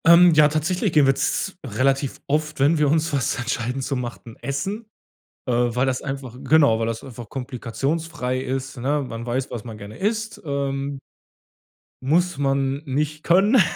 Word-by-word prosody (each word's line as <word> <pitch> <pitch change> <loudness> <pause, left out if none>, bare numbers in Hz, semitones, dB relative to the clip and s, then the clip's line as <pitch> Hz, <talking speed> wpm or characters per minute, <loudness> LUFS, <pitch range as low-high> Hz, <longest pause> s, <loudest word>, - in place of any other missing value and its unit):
Ähm, 170 +1 +8
ja, 150 -1 +7
tatsächlich 160 +6 0
gehen 150 -2 +6
wir 135 - +5
z 190 - -1
relativ 135 +3 0
oft, 150 +1 -1
wenn 150 +4 +4
wir 150 -2 +3
uns 160 +1 +1
was 135 -4 0
entscheiden 125 +2 -2
zu 135 - -2
machen, 120 -2 -6
essen, 150 - -3 0.6
äh, - - +1
weil 120 +1 +2
das 130 -1 -1
einfach 135 -3 -5
genau, 140 -5 +5
weil 115 - 0
das 115 -1 -3
einfach 120 -4 -9
komplikationsfrei 130 +2 -3
ist, 130 +1 -4
ne, 140 +4 0
man 115 0 -6
weiß, 130 +2 -2
was 115 -4 -5
man 115 -3 -8
gerne 105 +2 -10
isst, 220 +2 -2
ähm 140 -1 -2 1.1
muss 175 +5 +2
man 135 0 0
nicht 150 +2 -2
können 200 +7 +5
135 Hz, 165 wpm, -23 LUFS, 125-155 Hz, 1.1 s, Ähm